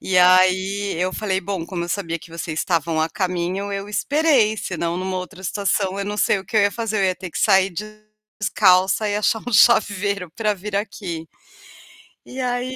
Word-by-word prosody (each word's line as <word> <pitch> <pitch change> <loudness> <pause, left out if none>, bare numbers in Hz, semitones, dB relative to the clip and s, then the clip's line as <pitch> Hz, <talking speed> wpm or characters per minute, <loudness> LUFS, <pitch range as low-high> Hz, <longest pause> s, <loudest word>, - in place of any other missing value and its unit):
E 185 - -1
aí, 185 +2 +3
eu 180 +2 -1
falei: 190 -2 -1
"Bom, 190 -2 -4
como 175 -2 -4
eu - - -8
sabia 170 -2 -2
que 165 - -15
vocês 165 -1 -5
estavam 165 -2 0
a 160 - +1
caminho, 185 +2 -2
eu 200 +1 -4
esperei, 265 -2 +2
senão, 170 -3 -3
numa 185 0 -3
outra 185 +1 -9
situação, 195 0 -1
eu 200 - -2
não 205 +1 -4
sei 210 - +2
o 190 - -10
que 220 - -4
eu - - +6
ia 200 - +3
fazer, 225 -1 -3
eu 195 - +2
ia 185 -1 +1
ter 180 0 -8
que - - -5
sair 195 -2 +3 0.7
descalça 190 0 +3
e 205 - 0
achar 215 +1 0
um 245 - -4
chaveiro 200 -4 +3
para 215 +4 -1
vir 200 +2 -7
aqui". 185 -6 -5 1.0
E 260 - -9
aí 250 +1 -2
195 Hz, 200 wpm, -21 LUFS, 180-210 Hz, 1.0 s, eu